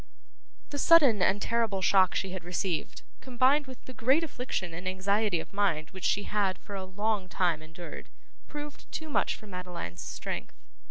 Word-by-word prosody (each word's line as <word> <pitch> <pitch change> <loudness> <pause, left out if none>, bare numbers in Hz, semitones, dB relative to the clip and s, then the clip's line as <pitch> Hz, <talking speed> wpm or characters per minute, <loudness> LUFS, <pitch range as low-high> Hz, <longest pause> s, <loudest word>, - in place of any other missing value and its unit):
The 285 - -3
sudden 280 - +6
and 195 +2 +3
terrible 220 -3 0
shock 185 -1 +5
she 190 - -1
had 185 -2 -6
received, 180 -1 -2 0.2
combined 260 +3 +2
with 260 -1 -11
the 255 - -9
great 265 +7 +3
affliction 250 - -3
and 180 +3 -6
anxiety 195 0 +1
of - - -8
mind 180 -6 0
which 190 -1 -6
she 205 - +2
had, 200 -3 0
for 205 - -11
a 190 -1 -4
long 205 0 -1
time, 170 -5 +1
endured, 165 +2 -9 0.4
proved 295 -1 -8
too 315 -1 -5
much - - +1
for - - -13
Madeline's 180 - -6
strength. - - -5
200 Hz, 170 wpm, -29 LUFS, 180-245 Hz, 0.4 s, sudden